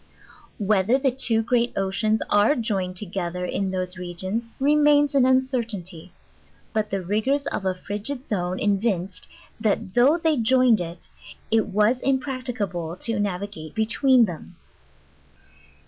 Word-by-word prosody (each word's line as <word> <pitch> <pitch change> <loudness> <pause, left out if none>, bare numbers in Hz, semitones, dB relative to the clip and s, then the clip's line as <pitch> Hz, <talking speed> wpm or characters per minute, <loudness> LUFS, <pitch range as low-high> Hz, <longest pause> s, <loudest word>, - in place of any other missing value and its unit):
Whether 210 +3 +2
the 270 -1 +1
two 235 -3 +1
great 240 +1 +1
oceans 205 +3 0
are 205 +7 +3
joined 195 -6 -2
together 180 -2 -3
in 195 +2 -2
those 185 0 -3
regions 185 +6 -3
re 285 +2 +3
mains 290 -1 +4
an 265 -2 +4
uncertainty; 230 - -1 0.6
but 215 -1 -1
the 195 -1 -3
rigors 220 +10 0
of 195 - -3
a 185 - 0
frigid 210 +8 -4
zone 180 -3 -2
evin 200 -2 0
ced, - - -10 0.3
that 215 -3 -1
though 265 +7 +4
they 320 -3 +1
joined 245 -2 +4
it, 170 0 -6 0.4
it 225 -1 +3
was 215 +5 +2
impracticable 250 - -2
to 230 +4 0
navi 200 0 -2
gate 155 -2 -10
between 235 +3 +4
them. 170 -6 -9
215 Hz, 140 wpm, -24 LUFS, 185-255 Hz, 0.6 s, mains